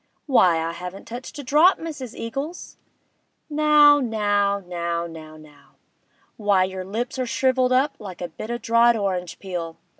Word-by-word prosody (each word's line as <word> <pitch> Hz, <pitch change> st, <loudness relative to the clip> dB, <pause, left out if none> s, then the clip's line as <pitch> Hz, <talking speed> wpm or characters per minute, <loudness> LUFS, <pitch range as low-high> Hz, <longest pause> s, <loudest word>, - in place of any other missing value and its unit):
'Why, 185 Hz, -, +4 dB
I 165 Hz, +1 st, -2 dB
haven't 180 Hz, +3 st, -8 dB
touched 245 Hz, +5 st, -8 dB
a 285 Hz, -, -6 dB
drop, 305 Hz, +8 st, +4 dB
Mrs. 290 Hz, -8 st, -7 dB
Eagles!' 275 Hz, +9 st, -6 dB, 0.8 s
'Now, 295 Hz, -1 st, +6 dB
now, 205 Hz, -4 st, +1 dB
now, 170 Hz, -2 st, -3 dB
now, 155 Hz, -2 st, -10 dB
now! 150 Hz, -2 st, -19 dB, 0.6 s
Why, 205 Hz, -3 st, +3 dB
your 185 Hz, 0 st, -4 dB
lips 235 Hz, +7 st, -4 dB
are 255 Hz, -, -1 dB
shrivelled 255 Hz, +2 st, +1 dB
up 275 Hz, +3 st, +2 dB
like 190 Hz, -4 st, -9 dB
a 175 Hz, -, -4 dB
bit 215 Hz, +7 st, -8 dB
of 240 Hz, -, -1 dB
o' 240 Hz, -, -9 dB
dried 230 Hz, 0 st, +4 dB
orange 185 Hz, -4 st, -3 dB
peel! 175 Hz, -4 st, -6 dB
210 Hz, 160 wpm, -23 LUFS, 180-260 Hz, 0.8 s, Now